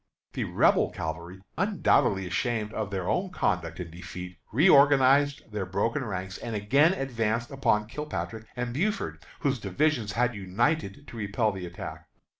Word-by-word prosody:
The - - -2
Rebel - - +3
cavalry, 85 +4 -6 0.2
undoubtedly 170 - +2
ashamed 110 +4 -1
of 110 -3 -2
their 95 -3 -3
own 185 +1 0
conduct 90 - -1
and 85 -2 -6
defeat, 90 +1 -8
reorganized 140 - +5
their 105 -3 -3
broken 115 +8 0
ranks, 95 -3 -5
and 115 - -5
again 140 - +4
advanced 120 - -1
upon 105 -6 +1
Kilpatrick 115 -4 -5
and 120 -1 -3
Buford, 205 - -2 0.2
whose 140 -4 +1
divisions 110 +2 0
had 125 +2 +1
united 105 - -1
to 120 - -10
repel 105 +1 0
the 95 -2 -6
attack. 85 - -8
110 Hz, 145 wpm, -28 LUFS, 95-140 Hz, 0.2 s, reorganized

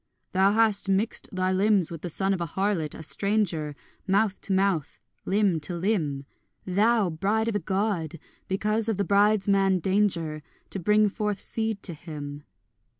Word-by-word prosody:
Thou 190 +2 +3
hast 215 -3 +2
mixed 200 +4 0
thy 185 0 0
limbs 195 -2 +2
with 165 -2 -7
the 175 - -4
son 195 +4 0
of 185 - -3
a 170 - -1
harlot, 190 -4 -1
a - - -8
stranger, 175 -5 0 0.3
Mouth 200 +1 +1
to - - -4
mouth, 190 -6 +1 0.3
limb 195 -4 +2
to 165 +4 -5
limb, 165 -7 -1 0.4
Thou, 205 +1 +2
bride 205 +7 0
of 225 - -1
a - - +2
God, 190 -3 -1 0.3
because 215 +3 0
of 220 - 0
the 200 - +1
bridesman 200 -1 +3
Danger, 175 -5 0 0.3
To 195 - -4
bring 210 +3 +4
forth 210 -1 -2
seed 220 -2 -3
to 175 - -3
him. 145 -2 -8
195 Hz, 160 wpm, -26 LUFS, 170-210 Hz, 0.4 s, bring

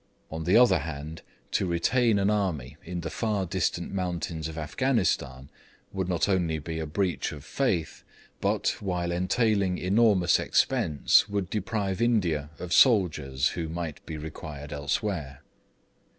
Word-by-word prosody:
On 80 0 -5
the 90 +6 +5
other 120 -8 +6
hand, 75 +1 -6 0.3
to 95 - +1
retain 110 +7 +2
an 100 +1 +2
army 80 -11 -1
in 90 0 -5
the 85 - -4
far 105 -4 -1
distant 85 - -2
mountains 85 -4 -3
of 80 0 -8
Afghanistan 75 - -1 0.4
would 95 -2 -2
not 90 +2 +1
only 90 -5 +1
be 80 +2 -5
a 80 - -3
breach 90 +3 -1
of 75 0 -10
faith, 95 - -1 0.4
but, - - +1
while 90 -3 -2
entailing 95 +1 +1
enormous 100 -2 +3
expense, 75 +6 +2
would 100 -3 -2
deprive 105 -1 -2
India 90 -11 +1
of 90 0 -4
soldiers 75 - +4
who 80 -2 -4
might 80 -2 -5
be 80 - -5
required 75 -1 -7
elsewhere. 70 -1 -3
85 Hz, 140 wpm, -27 LUFS, 80-100 Hz, 0.4 s, other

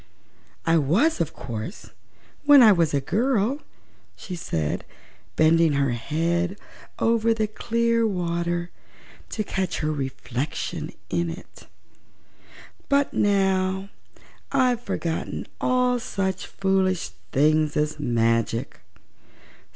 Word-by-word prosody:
"I 165 0 +4
was, 190 - +2
of 165 - -1
course, 120 - -7 0.5
when 290 -3 +9
I 220 - +8
was 170 -5 +3
a 140 - +2
girl," 235 - +1 0.6
she 185 - -7
said, 80 - -2 0.5
bending 160 0 +4
her 140 -2 +1
head 170 - -1 0.4
over 230 0 +2
the 220 -1 +1
clear 230 +1 +1
water 175 -2 -2 0.6
to 215 - -2
catch 190 -2 -2
her 155 0 0
reflection 135 -1 -4 0.2
in 170 0 0
it; 165 +3 -10 1.2
"but 280 0 +2
now 190 -1 +1 0.6
I've 255 -3 +2
forgotten 165 -8 -3 0.2
all 250 -1 +2
such 195 -5 -3
foolish 190 - 0 0.2
things 155 +2 +3
as 150 0 0
magic. 115 -2 0
180 Hz, 105 wpm, -24 LUFS, 155-220 Hz, 1.2 s, when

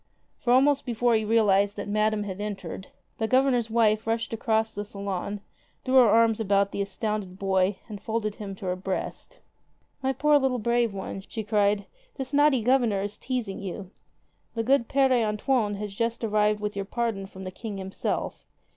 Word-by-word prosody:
For 240 - 0
almost 275 +3 +4
before 240 -1 +1
he 220 -1 +2
realized 205 -2 +3
that 205 - -4
Madame 215 0 +1
had 200 -1 -5
entered, 195 -3 -5 0.3
the 220 - 0
Governor's 255 -2 +2
wife 220 -1 +2
rushed 225 0 -1
across 220 -1 0
the 205 - -4
salon, 200 0 -4 0.4
threw 255 - -1
her 245 -4 +7
arms 225 0 +4
about 200 -2 +2
the 200 - -2
astounded 200 -1 -3
boy 190 0 +1
and 205 -3 -8
folded 220 -1 -2
him 200 -2 -6
to 190 - -9
her 180 0 0
breast. 190 - -5 0.6
"My 265 0 +1
poor 295 +3 +4
little 265 -2 +1
brave 235 0 +1
one!" 195 0 -6
she 220 - -4
cried, 205 -1 +1 0.3
"this 265 0 -6
naughty 290 -4 +4
Governor 235 -5 +2
is 205 0 -4
teasing 240 -7 -3
you. 190 0 -6 0.6
The 225 - 0
good 255 0 +3
Pere 265 -3 +3
Antoine 210 0 0
has 205 0 -5
just 230 +3 -2
arrived 210 -1 +2
with 210 -1 -3
your 200 -1 -3
pardon 220 -3 -2
from 190 -1 -10
the 185 - -5
King 210 +1 -6
himself. 190 0 -3
215 Hz, 180 wpm, -26 LUFS, 200-235 Hz, 0.6 s, her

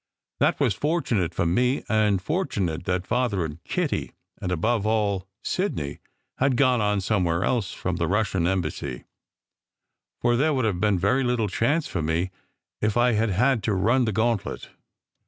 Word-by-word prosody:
That - - +2
was - - +2
fortunate 125 - 0
for 85 - -1
me; 125 +10 +1
and 105 -2 +2
fortunate 95 - -2
that 90 0 -1
Father 115 -8 0
and 80 +1 -8
Kitty, - - -2 0.3
and 90 - -2
above 105 +6 +1
all 100 -4 0 0.2
Sidney, 80 - -2 0.4
had 135 -1 +2
gone 130 -4 +3
on 105 -1 +1
somewhere 90 -4 +1
else 115 -6 0
from - - -3
the - - 0
Russian 95 -4 +1
Em 95 0 +1
bassy, 70 -6 -5 1.2
for 120 0 +2
there 150 +4 +2
would 130 -3 +1
have 100 -5 0
been 105 -2 +3
very 130 +9 +2
little 120 -4 0
chance 145 - +1
for 85 - -3
me 80 +4 -1 0.5
if 110 +1 +1
I 120 +1 +4
had 110 0 +1
had 120 +5 +2
to 105 - +1
run 115 +7 +3
the 110 - 0
gauntlet. 110 0 -1
105 Hz, 170 wpm, -25 LUFS, 90-125 Hz, 1.2 s, I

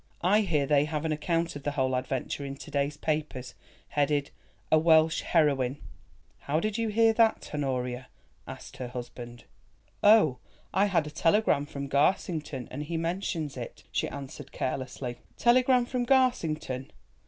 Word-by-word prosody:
I 200 +5 +4
hear 165 -9 +1
they 145 0 +3
have 155 0 -3
an 160 - 0
account 165 +2 -1
of 145 - -6
the 145 +1 -2
whole 130 -2 0
adventure 130 +2 -3
in 140 0 -5
to 155 - -11
day's 140 +1 -1
papers, 150 -5 -3 0.4
headed, 145 -1 0 0.4
'A 155 - +6
Welsh 160 0 +4
Heroine.'" 140 -5 +2 0.6
"How 150 +3 -1
did 215 +3 -2
you 230 0 0
hear 225 +1 +4
that, 225 0 +2
Honoria?" 125 -3 -2 0.4
asked - - -9
her 125 - -4
husband. 120 -1 -8 0.6
"Oh, 205 - +5 0.3
I 195 +3 +3
had 175 -6 +1
a 150 - -7
telegram 165 -4 +2
from 140 -1 -5
Garsington, 150 - 0
and 135 - -5
he 165 +2 -3
mentions 165 -3 -2
it," 120 -2 -8
she - - -1
answered 135 -1 -8
carelessly. 130 -1 -4 0.2
"Telegram 250 +1 +4
from 245 0 -2
Garsington! 160 - +1
150 Hz, 155 wpm, -28 LUFS, 135-175 Hz, 0.6 s, A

